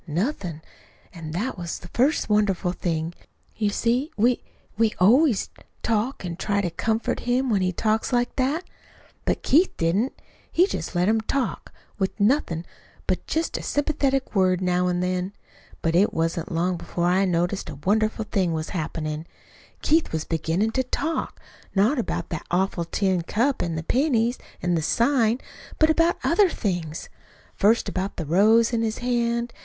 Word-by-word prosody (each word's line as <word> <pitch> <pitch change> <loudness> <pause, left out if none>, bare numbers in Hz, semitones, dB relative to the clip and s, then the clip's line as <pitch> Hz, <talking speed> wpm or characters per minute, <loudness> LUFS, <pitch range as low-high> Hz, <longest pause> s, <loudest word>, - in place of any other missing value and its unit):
"Nothin'. 170 - -2 0.5
An' 165 -3 -7
that 200 +6 -3
was 170 -2 -4
the 175 - -11
first 275 +5 +2
wonderful 205 -4 +2
thing. 165 -2 -2 0.4
You 210 -2 +1
see, 240 +7 0
we 240 +3 +3 0.3
we 220 0 +2
always 235 - +4 0.3
talk 225 0 0
an' 170 -1 -4
try 200 +1 0
to 180 -4 -1
comfort 220 +6 -1
him 255 +1 +2
when 200 -3 +2
he 185 0 +1
talks 215 +4 0
like 245 -1 +1
that. 280 +7 +1 0.6
But - - 0
Keith 335 +7 +3
didn't. 190 +10 0 0.3
He 355 - +5
just 380 - -4
let 175 +1 +2
him 220 +1 +3
talk, 255 +2 -2 0.3
with 190 +2 -1
nothin' 200 - +1 0.4
but - - -2
just 320 +1 -1
a - - -6
sympathetic 280 -2 0
word 185 -3 +3
now 180 -1 +1
an' 180 0 0
then. 180 +1 -1 0.5
But 165 - +1
it 195 +4 +3
wasn't 165 0 -1
long 175 +2 0
before 170 0 -3
I 185 +2 +3
noticed 175 0 0
a 150 - -6
wonderful 215 +2 +1
thing 185 -5 0
was 155 -1 -3
happenin'. 155 -2 -4 0.6
Keith 320 +2 +2
was 160 -1 -2
beginnin' 165 +7 0
to 260 +3 0
talk 310 +5 -2 0.4
not 220 +8 +3
about 235 - -3
that 160 - -5
awful 180 -1 0
tin 185 +1 0
cup 240 +10 0
an' 170 -2 -2
the 160 - -3
pennies 245 - +1 0.2
an' 175 0 +1
the 165 - +1
sign, 235 - +2 0.4
but 315 0 +5
about 330 +2 +3
other 370 +3 +4
things; 175 - -3 0.5
first 220 +4 +3
about 190 +2 -3
the 165 - -3
rose 220 - +4
in 230 - +1
his 220 -1 -1
hand. 235 -1 0
205 Hz, 165 wpm, -24 LUFS, 175-245 Hz, 0.6 s, He